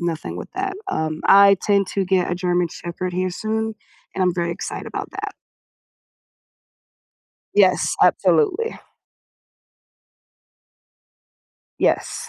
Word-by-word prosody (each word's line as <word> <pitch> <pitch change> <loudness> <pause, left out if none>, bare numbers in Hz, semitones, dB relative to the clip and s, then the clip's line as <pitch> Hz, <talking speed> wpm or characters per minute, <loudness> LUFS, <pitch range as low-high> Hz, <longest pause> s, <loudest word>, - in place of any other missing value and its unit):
nothing 160 - -3
with - - -8
that, 385 0 -2 0.2
um, 155 0 -2
I 200 0 +7
tend 200 -2 +2
to 195 - -1
get 185 -1 +1
a - - 0
German 180 -1 0
shepherd 175 +2 -6
here 185 0 0
soon, 220 +3 -2 0.4
and 190 - 0
I'm 180 -1 +2
very 170 -1 -1
excited 170 - -5
about - - -5
that. - - -5 2.2
Yes, 190 -3 +3
absolutely. 450 +1 +2 3.0
Yes. - - 0
185 Hz, 105 wpm, -21 LUFS, 175-205 Hz, 3.0 s, I